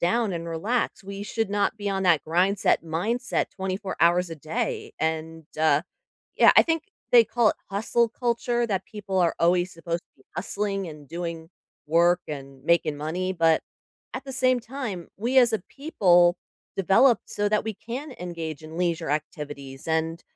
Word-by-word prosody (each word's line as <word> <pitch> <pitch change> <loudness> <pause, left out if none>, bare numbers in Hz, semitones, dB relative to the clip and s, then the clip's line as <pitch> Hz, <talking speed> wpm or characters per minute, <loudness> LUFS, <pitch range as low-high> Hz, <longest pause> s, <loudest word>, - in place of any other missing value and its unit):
down 205 +4 +1
and 170 -1 -4
relax, 205 +12 -1
we 200 +1 -6
should 225 +1 -2
not 205 +2 +1
be 205 -1 -3
on 195 -1 -1
that 170 -6 +3
'grindset-mindset' 185 +5 +1
24 190 +1 -4
hours 175 +1 +4
a 165 - -6
day." 430 - -3
And, 160 0 -3
uh 155 -1 +4 0.5
yeah, - - +7
I - - +10
think 325 -1 -1 0.3
they 235 -2 +8
call 235 0 +2
it - - -6
"hustle 225 +4 +1
culture" 240 0 0
that 195 -4 -1
people 195 -3 -4
are 170 -2 +3
always 175 +2 +2
supposed 170 +1 -4
to - - -38
be - - -24
hustling, 200 -2 -2
and 150 -2 -11
doing 170 0 -5 0.4
work, 170 +3 +4
and 135 -3 -8
making 160 -2 +2
money, 175 +5 -2
but 165 -3 +3 0.5
at 255 - -5
the 270 - -7
same 255 -1 +2
time, 230 -8 -6
we 240 +6 +2
as 240 -2 +5
a 220 - +2
people 180 - +3 0.4
develop 195 +6 +4
so 205 0 -1
that 210 0 +1
we 220 - -2
can 255 +7 -7
engage 165 -4 -5
in 160 +1 -9
leisure 170 -5 0
activities, 145 -3 -5
and 160 +1 -1
180 Hz, 170 wpm, -25 LUFS, 165-225 Hz, 0.5 s, I